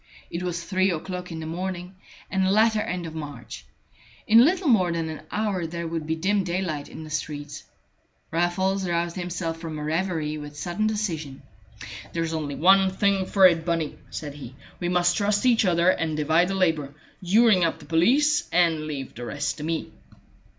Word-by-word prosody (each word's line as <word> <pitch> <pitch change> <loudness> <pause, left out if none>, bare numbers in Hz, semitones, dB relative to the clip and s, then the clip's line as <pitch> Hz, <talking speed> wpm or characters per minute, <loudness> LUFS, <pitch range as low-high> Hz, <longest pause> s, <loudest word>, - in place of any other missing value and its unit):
It 170 - -3
was 175 -2 -3
three 190 +1 +1
o'clock 180 +1 -4
in 160 - -5
the - - -5
morning, 180 +2 -4 0.4
and 190 0 +1
the 190 - +2
latter 215 +2 +3
end 180 -4 -3
of 160 - -7
March. 145 -6 -8 0.6
In 225 +2 +7
little 355 +4 +2
more 190 -9 +4
than 165 -1 -2
an 155 - -6
hour 205 -5 -1
there 170 +1 -5
would 165 -1 -4
be 160 - 0
dim 195 +4 +1
daylight 175 -5 -3
in 160 - -9
the 155 - -10
streets. 145 -1 -5 0.7
Raffles 185 +3 0
roused 170 0 -1
himself 175 -2 -3
from 160 -2 -6
a 150 - -5
reverie 155 -1 -1
with 150 0 -9
sudden 175 +8 -1
decision. 165 -11 -3 0.7
"There's 165 -1 -2
only 150 -3 -3
one 190 +6 +5
thing 195 0 +1
for 195 -2 +5
it, 170 -3 +5
Bunny," 165 -3 -2
said 145 -2 -6
he. 135 -3 -10 0.2
"We 175 - -1
must 175 -1 +2
trust 205 +2 +1
each 235 -3 +4
other 175 0 +4
and 160 -4 -2
divide 160 +4 +3
the 195 - -2
labor. 160 -6 0 0.3
You 200 +6 +4
ring 185 -5 +5
up 165 -1 +1
the 155 - -14
police, 265 - +3
and 165 -3 +2
leave 140 -3 -5
the 120 +1 -7
rest 145 +4 -3
to - - -5
me." 160 +1 -3
170 Hz, 190 wpm, -25 LUFS, 160-190 Hz, 0.7 s, In